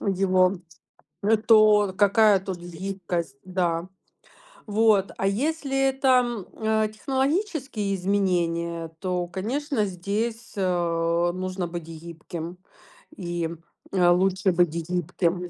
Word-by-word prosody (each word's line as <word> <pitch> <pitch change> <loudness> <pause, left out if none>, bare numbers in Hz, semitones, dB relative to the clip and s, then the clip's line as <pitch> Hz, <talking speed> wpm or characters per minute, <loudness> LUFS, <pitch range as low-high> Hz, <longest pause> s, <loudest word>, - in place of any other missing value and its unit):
его, 185 -1 +2 0.6
лю 215 +3 +4
то, 215 -2 +6
р - - -6
какая 205 0 +5
тут 190 -1 -5
гибкость, 175 -3 -4
да. 180 -2 -1 0.8
Вот. 210 -2 +3
А 195 - 0
если 275 +5 -1
это, 270 0 -2 0.2
м, 235 -6 -4 0.2
э, 220 0 +2
технологические 265 - -1
изменения, 170 -3 0
то, 180 -2 -2
конечно, 225 +6 -2
здесь, 210 +5 -3
э, 175 -2 +1
нужно 185 -1 -3
быть 170 0 -6
гибким 165 +1 -8 0.6
и, 175 -2 -3
м, 165 0 -7 0.3
э, 180 -2 +4
лучше 190 +1 +3
быть 175 -1 +3 0.2
гибким, 180 0 -1
э, - - -8
185 Hz, 115 wpm, -25 LUFS, 175-215 Hz, 0.8 s, то